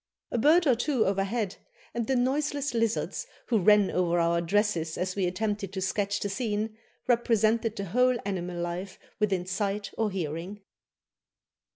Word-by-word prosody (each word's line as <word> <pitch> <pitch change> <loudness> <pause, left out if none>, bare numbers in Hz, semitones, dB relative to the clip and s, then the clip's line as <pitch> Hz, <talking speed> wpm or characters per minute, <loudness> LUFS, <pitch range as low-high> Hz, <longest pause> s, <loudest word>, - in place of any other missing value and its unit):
A 240 - 0
bird 325 +8 +5
or 270 - +5
two 245 0 +1
overhead, 195 +1 -1 0.4
and 235 -2 -2
the 265 - +2
noiseless 285 +2 0
lizards 230 -1 -1 0.2
who 230 -3 +3
ran 205 +1 +5
over 175 -1 +1
our 170 0 +2
dresses 170 -3 0
as 185 +1 -2
we 190 -3 +1
attempted 205 +1 -2
to 190 - -3
sketch 200 +2 0
the - - -2
scene, 215 +1 -2 0.3
represented 225 -2 +2
the 200 - -4
whole 250 +6 +3
animal 180 -3 -3
life 175 +2 -4 0.2
within 195 -4 +1
sight 200 +2 -2
or 220 -1 +2
hearing." 180 +2 -4
205 Hz, 155 wpm, -28 LUFS, 185-230 Hz, 0.4 s, bird